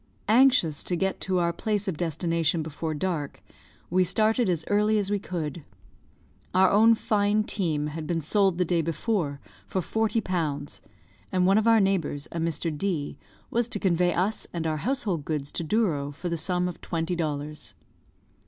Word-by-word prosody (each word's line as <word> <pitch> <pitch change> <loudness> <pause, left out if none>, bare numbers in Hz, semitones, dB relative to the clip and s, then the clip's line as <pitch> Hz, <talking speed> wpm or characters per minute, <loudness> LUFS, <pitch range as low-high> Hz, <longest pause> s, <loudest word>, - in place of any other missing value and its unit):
Anxious 230 - +4
to 180 - 0
get 190 +2 -1
to 185 -1 0
our 170 -1 +1
place 210 +2 -1
of 190 - -1
destination 165 0 0
before 155 +1 -4
dark, 150 -3 -3 0.5
we 185 +1 +4
started 215 +4 +2
as 165 -3 -1
early 210 +1 +3
as 205 -1 -1
we 205 - +1
could. 165 -5 -4 0.9
Our 190 0 +5
own 225 +3 +6
fine 210 0 +1
team 160 -8 -1
had 155 +1 -5
been 170 0 0
sold 190 +3 +2
the 180 - +2
day 170 0 +1
before 165 -2 -1 0.3
for 190 - -1
forty 220 +5 0
pounds; 160 -8 -2 0.5
and 185 -1 +2
one 195 +3 +5
of 220 - 0
our 225 -1 +6
neighbours, 180 -7 0
a 170 - -4
Mr. 165 -1 -1
D, 160 -4 -2 0.3
was 235 0 +1
to 210 - -2
convey 180 -2 +2
us 190 +6 0
and 170 -2 -3
our 155 -1 0
household 205 - -1
goods 145 -2 -3
to - - -4
Douro 155 -6 0
for 170 +5 -5
the 170 - -1
sum 180 +2 0
of 180 - -7
twenty 165 +1 -2
dollars. 150 -2 -4
175 Hz, 175 wpm, -26 LUFS, 160-205 Hz, 0.9 s, own